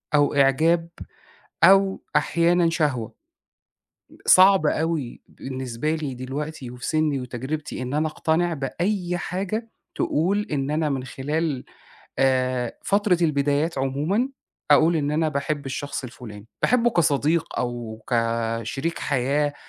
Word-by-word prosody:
أو 145 0 +3
إعجاب، 160 +5 +3 0.7
أو 195 0 +5
أحيانًا 170 +2 +3
شهوة، 145 - -1 1.1
صعب 190 -3 +6
أوي 155 -6 -1
بالنسبة 130 +3 -4
لي 150 -4 -4
دلوقتي 135 +1 -5
وفي 125 0 -7
سني 155 -3 +1
وتجربتي 130 +4 -5
إن 125 +2 -4
أنا 155 +1 +1
أقتنع 165 +2 0
بأي 175 +6 -2
حاجة 200 +6 -3 0.3
تقول 195 +7 0
إن 140 0 -1
أنا 155 0 0
من 135 -2 -2
خلال 145 +1 -2 0.6
آآ 130 -2 +1
فترة 200 -3 +2
البدايات 145 0 +1
عمومًا 150 - 0 0.4
أقول 160 +3 +5
إن 145 -1 0
أنا 155 0 +1
باحب 140 0 -2
الشخص 135 +2 -4
الفلاني، 115 -4 -10
باحبه 240 -1 +3
كصديق 160 -2 +1
أو 120 -3 -4
كشريك 115 +5 -1
حياة 145 +2 0
150 Hz, 115 wpm, -24 LUFS, 130-165 Hz, 1.1 s, صعب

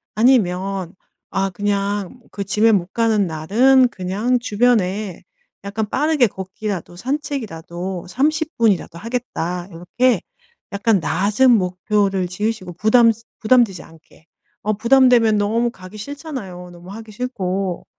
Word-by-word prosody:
아니면 195 -6 +1 0.3
아 195 0 -1
그냥 205 +3 -2
그 200 - -4
짐에 215 +3 +3
못 190 -2 0
가는 220 -4 +2
날은 240 +12 +3
그냥 210 +5 -1
주변에 210 -5 0 0.4
약간 205 +1 -3
빠르게 295 -3 +2
걷기라도, 190 -2 -6
산책이라도 190 - -4
30 310 - 0
분이라도 200 -7 +1
하겠다 180 -7 -4
요렇게 180 +9 0 0.5
약간 200 0 +2
낮은 200 - +2
목표를 195 -1 +1
지으시고 185 -1 -3
부담 230 +5 +4 0.3
부담되지 225 -5 +3
않게 160 0 -20 0.4
어 215 - +2
부담되면 235 -1 +4
너무 230 +4 +1
가기 185 0 -12
싫잖아요. 210 - -7
너무 175 +1 -13
하기 220 +1 -9
싫고. 195 -6 -3
205 Hz, 270 characters per minute, -20 LUFS, 185-240 Hz, 0.5 s, 부담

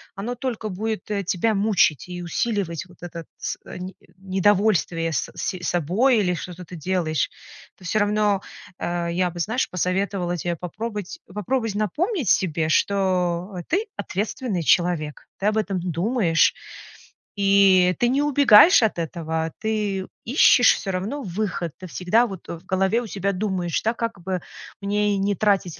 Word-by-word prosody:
оно 220 +5 -4
только 235 -3 -4
будет, 215 +3 -4
э, 200 -1 -1
тебя 195 +5 0
мучить 195 -8 +2
и 180 0 -6
усиливать 175 -1 -2
вот 180 -1 -19
этот 170 -1 -7
с - - -4
э, - - -8
не 185 +1 -7 0.2
недовольствие 190 -3 +1
с 145 - -2
с 185 - -3
собой, 190 - +2
или 180 -3 +1
что-то 180 +1 -7
ты 180 - -10
делаешь. 165 -1 -1 0.5
Это - - -19
всё 180 - 0
равно, 205 -1 +2 0.4
э 175 0 -2
я 180 +1 0
бы, 175 - -9
знаешь, 220 +9 0
посоветовала 180 0 -1
те 175 +1 -2
попробовать, 205 +4 -5 0.2
попробовать 225 +2 -1
напомнить 270 - -1
себе, 160 -3 +2
что 185 0 +1
ты- 405 +6 0
ответственный 210 - -3
человек. 165 -2 +1
Ты 200 - 0
об 215 +1 +1
этом 200 -3 -1
думаешь 175 +1 +2 0.8
и 195 -2 +5
ты 240 - +3
не 270 +3 +2
убегаешь 285 - +7
от 215 -5 +1
этого, 160 -1 -3
ты 210 -3 -1 0.2
ищешь 245 0 +6
всё 195 - -4
равно 205 +10 -3
выход. 180 -3 -3
Ты 185 - -8
всегда 185 +8 +2
вот, 190 -5 -9
э, 170 - -5
в 175 - -25
голове 190 +4 +1
у 240 - -7
себя 200 0 -1
думаешь, 185 -4 -1
да: 225 - +1
как 230 -5 -4
бы 185 0 -3 0.4
мне 205 0 +1
не 200 +1 +1
тратить 195 -5 +1
195 Hz, 160 wpm, -23 LUFS, 175-215 Hz, 0.8 s, убегаешь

